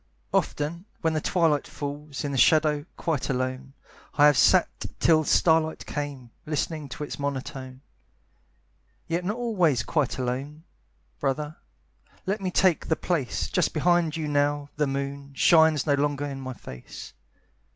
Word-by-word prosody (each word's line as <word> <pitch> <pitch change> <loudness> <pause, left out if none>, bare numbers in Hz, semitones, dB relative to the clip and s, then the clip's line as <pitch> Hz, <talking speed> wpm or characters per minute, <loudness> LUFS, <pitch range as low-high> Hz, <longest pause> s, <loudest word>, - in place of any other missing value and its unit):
Often, 165 +5 -1 0.2
when 160 -1 +1
the 155 - 0
twilight 165 -5 +1
falls, 145 0 -6
In 145 - -2
the 135 - -2
shadow, 155 0 +4
quite 160 -5 -1
alone, 130 +1 -2 0.4
I 145 - +6
have 150 -1 +6
sat 115 - +5 0.3
till 160 -1 +4
starlight 160 0 +2
came, 140 -5 -5 0.2
Listening 155 -1 -2
to 150 - -6
its 145 - -6
monotone. 130 -2 -5 1.2
Yet 170 +2 -2
not 205 +5 -2
always 180 - +1
quite 145 +3 0
alone, 135 +5 -4 0.6
Brother, 150 +3 -2 0.7
let 200 +2 -1
me 185 - -1
take 180 -2 +2
the 160 - +2
place 155 -10 -1
Just - - 0
behind 175 -3 +2
you 155 -2 -3
now 145 0 0
the 150 -1 +1
moon 140 0 -4
Shines 160 -2 +5
no 145 - +3
longer 145 0 0
in 135 -1 -5
my 130 -1 -5
face. 65 - -10
145 Hz, 145 wpm, -26 LUFS, 140-160 Hz, 1.2 s, I